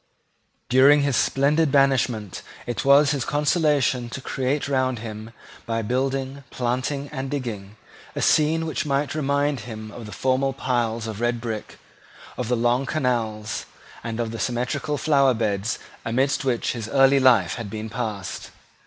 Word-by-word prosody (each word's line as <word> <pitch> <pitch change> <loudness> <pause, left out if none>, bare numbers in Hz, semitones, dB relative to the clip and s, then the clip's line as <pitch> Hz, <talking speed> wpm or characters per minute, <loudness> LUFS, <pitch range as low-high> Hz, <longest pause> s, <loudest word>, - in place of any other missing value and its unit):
During 140 +3 +6
his 140 -3 +1
splendid 145 +5 +2
banishment 130 -7 +1 0.2
it 120 - -3
was 140 +1 +6
his 140 -4 -1
consolation 145 -5 +1
to 125 - -6
create 135 +2 -2
round 130 -2 +1
him, 110 0 -7 0.4
by 115 0 -1
building, 135 +3 -2
planting, 130 +3 -2
and 135 -2 -5
digging, 110 -8 -5 0.4
a - - -2
scene 160 +1 +3
which 160 - -2
might 140 0 -1
remind 145 -1 0
him 110 -1 -8
of 115 -1 -9
the - - -9
formal 130 +2 0
piles 120 -4 -1
of 110 -1 -6
red 120 0 0
brick, 115 -2 -5 0.6
of 125 - -3
the 125 0 +1
long 120 +3 +1
canals, 115 -7 -2 0.4
and 115 0 -4
of 115 -2 -1
the 115 - -6
symmetrical 125 +4 -1
flower 140 -5 +3
beds 110 -1 -1 0.3
amidst 130 +6 0
which 125 -3 0
his 115 -3 -5
early 135 +2 +5
life 120 -9 +4
had 115 -4 -6
been 110 +1 -5
passed. 110 -4 -5
130 Hz, 155 wpm, -24 LUFS, 115-140 Hz, 0.6 s, During